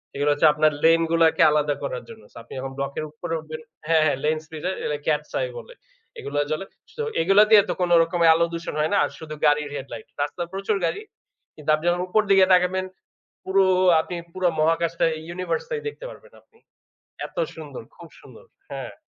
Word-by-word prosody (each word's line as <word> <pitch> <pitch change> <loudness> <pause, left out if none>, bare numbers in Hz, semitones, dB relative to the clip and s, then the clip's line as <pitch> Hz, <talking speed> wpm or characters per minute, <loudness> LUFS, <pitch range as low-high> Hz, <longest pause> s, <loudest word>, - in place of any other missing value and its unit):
এগুলো 145 +1 0
হচ্ছে 145 +2 +4
আপনার 155 +1 +3
লেনগুলাকে 165 0 +3
আলাদা 150 -1 +1
করার 130 -3 -4
জন্য। 225 -1 -12
সো - - -16
আপনি - - -13
যখন 135 +1 -5
block 140 0 -3
এর - - -3
উপরে 165 +2 -6
উঠবেন 155 0 -8 0.3
হ্যাঁ, 160 -1 +4
হ্যাঁ, 145 -3 +1
lane 155 +1 +1
splitter 160 +3 -4
এগুলো 150 - -2
cats 150 -1 0
eye - - -2
বলে। 485 +1 -10 0.5
এগুলো 145 +1 -5
জ্বলে। 155 +5 -2 0.3
তো 455 - -2 0.2
এগুলো 195 +5 +5
দিয়ে 215 -2 +9
তো - - +1
কোনোরকম 170 0 +3
আলো 170 +1 +2
দূষণ 170 0 -5
হয় 155 +1 0
না। - - +3
আর - - -1
শুধু 155 -1 -8
গাড়ির 150 0 +2
headlight। 135 - -8
রাস্তা 145 +4 -3
প্রচুর 195 +2 -1
গাড়ি। 165 - -2 0.5
কিন্তু 155 0 -8
আপনি 155 +2 -8
যখন 175 +1 0
উপর 215 +4 +3
দিকে 195 -1 +6
তাকাবেন 185 +1 +2 0.6
পুরো 190 +1 +3 0.4
আপনি 175 - -7 0.2
পুরো 185 -1 0
মহাকাশটা, 165 +1 +1 0.3
universe 180 -2 -2
টাই 460 -2 -3
দেখতে 470 +3 -7
পারবেন - - -15
আপনি। 445 - -30 0.7
এত - - -25 0.2
সুন্দর! 485 - -9
খুব - - -13
সুন্দর। - - -16 0.3
হ্যাঁ। - - -6
165 Hz, 190 wpm, -23 LUFS, 155-185 Hz, 0.7 s, দিয়ে